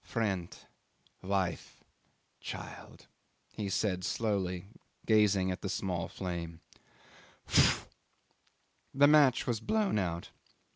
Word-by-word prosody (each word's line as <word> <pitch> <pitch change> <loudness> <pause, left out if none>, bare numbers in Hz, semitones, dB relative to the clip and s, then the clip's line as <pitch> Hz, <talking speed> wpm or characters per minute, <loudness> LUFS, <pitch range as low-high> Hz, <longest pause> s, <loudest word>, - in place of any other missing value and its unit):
'"Friend, 95 -6 -2 0.6
wife, 95 -3 -2 0.6
child," - - -9 0.5
he 105 -2 -3
said 95 -2 0
slowly, 95 -5 -1 0.4
gazing 100 -4 +3
at 90 - -5
the 95 - -3
small 90 -3 -2
flame 85 -3 -5 0.9
"phoo!" - - +4 1.1
The 140 +1 +6
match 145 -4 +5
was 120 -3 -1
blown 210 - +1
out. 85 -3 -3
95 Hz, 95 wpm, -32 LUFS, 90-110 Hz, 1.1 s, The